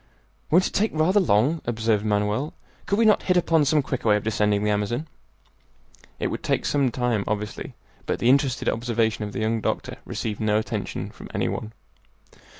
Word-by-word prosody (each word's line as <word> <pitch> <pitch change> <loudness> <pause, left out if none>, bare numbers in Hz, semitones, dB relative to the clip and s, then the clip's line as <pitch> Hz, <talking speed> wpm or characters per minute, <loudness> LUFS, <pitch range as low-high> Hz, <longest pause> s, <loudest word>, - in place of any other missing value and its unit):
"Won't 180 +4 +4
it - - -2
take 215 +2 +1
rather 170 +6 +3
long?" 150 - +2
observed 110 -2 0
Manoel; 105 +7 0 0.3
"could 200 - +1
we 230 - +4
not 215 - +5
hit 180 -1 +2
upon 165 -3 +3
some 150 +1 +3
quicker 130 -4 -2
way 105 - +6
of 105 - -1
descending 105 -1 +1
the 105 - +2
Amazon?" 110 +9 -1 1.1
It - - -2
would - - -4
take - - 0
some 140 -3 +2
time, 120 -4 0
obviously, 105 0 -4 0.3
but - - 0
the 115 - 0
interested 135 -1 +2
observation 115 -2 0
of 105 - -6
the 110 - -4
young 110 +1 0
doctor - - -2
received 105 -2 -4
no 105 -1 +2
attention 110 - -3
from - - -12
any - - 0
one. 110 - -4
115 Hz, 185 wpm, -24 LUFS, 105-150 Hz, 1.1 s, way